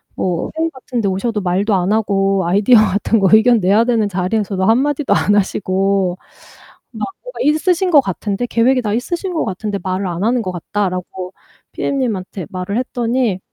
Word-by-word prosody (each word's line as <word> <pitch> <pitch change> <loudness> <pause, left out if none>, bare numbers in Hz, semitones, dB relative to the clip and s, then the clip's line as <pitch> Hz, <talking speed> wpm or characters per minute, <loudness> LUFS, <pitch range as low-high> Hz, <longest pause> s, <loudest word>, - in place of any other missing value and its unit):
뭐 175 -3 -2
회의 325 +1 +1
같은데 245 -5 -3
오셔도 205 +3 -1
말도 195 +3 +1
안 185 +1 0
하고 195 -3 +1
아이디어 200 +7 +4
같은 210 +2 +2
거 195 -2 +3
의견 225 +1 +6
내야 200 +4 +3
되는 230 -4 +1
자리에서도 190 +1 -1
1 225 +4 +4
마디도 290 0 0
안 205 - +2
하시고 195 -2 0 0.7
막 - - -4 0.2
뭐가 - - -10
있으신 355 +5 +2
것 290 -4 +7
같은데 200 +3 -3
계획이 250 +2 +2
다 210 -2 -2
있으신 345 +9 -3
것 320 - -1
같은데 200 +1 -3
말을 185 +1 -2
안 175 +2 -3
하는 240 +2 +1
것 185 -4 -4
같다."라고 185 0 -4 0.4
PM님한테 205 - -3
말을 185 +3 -4
했더니 240 -5 -1
205 Hz, 355 characters per minute, -17 LUFS, 190-245 Hz, 0.7 s, 것